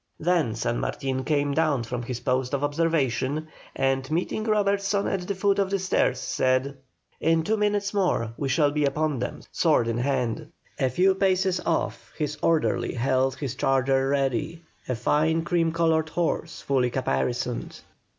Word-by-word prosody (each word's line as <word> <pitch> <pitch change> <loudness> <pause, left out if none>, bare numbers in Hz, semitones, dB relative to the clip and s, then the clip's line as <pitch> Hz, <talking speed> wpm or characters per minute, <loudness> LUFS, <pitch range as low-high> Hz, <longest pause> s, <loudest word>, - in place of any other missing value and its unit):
Then 160 -9 +1
San 120 +1 -1
Martin 130 -1 -2
came 145 -1 +1
down 150 -5 +1
from 120 +2 -4
his 120 0 -5
post 130 0 0
of 140 - -3
observation, 145 -1 0 0.3
and, 135 0 0
meeting 180 +6 -1
Robertson 200 -2 +1
at 180 -2 -2
the 200 - -2
foot 200 +1 +1
of 195 -1 +1
the 200 - +1
stairs, 185 -8 +1
said: 130 +2 0 0.4
"In 165 0 +2
two 215 +6 +1
minutes 205 -1 0
more 175 - 0
we 140 +1 -3
shall 145 +2 +3
be 150 0 0
upon 145 0 0
them, - - -4
sword 115 - +2
in 115 0 -1
hand." 135 +2 -1 0.3
A 130 -2 +2
few 185 +9 +3
paces 190 -1 +1
off - - -1
his 150 -2 -2
orderly 165 -4 +1
held 130 +1 +1
his 130 -2 -4
charger 135 0 +1
ready, 140 +4 -1 0.3
a 125 - 0
fine 160 +7 +1
cream 170 -1 +1
coloured 160 -1 +1
horse, 165 -1 -2
fully 130 -3 +1
caparisoned. 120 - -2
145 Hz, 160 wpm, -25 LUFS, 130-170 Hz, 0.4 s, shall